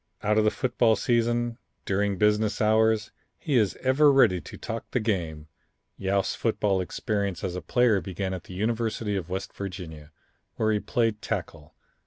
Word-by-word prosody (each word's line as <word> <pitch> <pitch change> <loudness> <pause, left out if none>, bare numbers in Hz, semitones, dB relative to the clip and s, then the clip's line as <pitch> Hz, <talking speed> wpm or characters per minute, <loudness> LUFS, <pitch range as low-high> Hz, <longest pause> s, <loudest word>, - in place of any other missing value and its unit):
Out 105 +1 +3
of - - +3
the 110 - +4
football 120 -2 +2
season, 120 +2 0 0.3
during 100 0 0
business 105 0 +2
hours, 110 0 +3 0.3
he 150 -4 -2
is 105 -5 +2
ever 140 +3 +5
ready 115 -10 +4
to - - -10
talk 115 +1 -6
the 125 - 0
game. 85 -9 -2 0.5
Yost's 95 0 0
football 105 -4 0
experience 100 -1 -2
as 90 -2 -2
a 90 - -4
player 120 -6 +2
began 95 0 -4
at 90 - -6
the 90 - -10
University 110 0 -1
of 90 -3 -4
West 95 +1 -4
Virginia, 85 -6 -7 0.4
where 110 -1 +1
he 105 - +1
played 115 -1 0
tackle. 75 -2 -5
105 Hz, 165 wpm, -26 LUFS, 95-115 Hz, 0.5 s, ever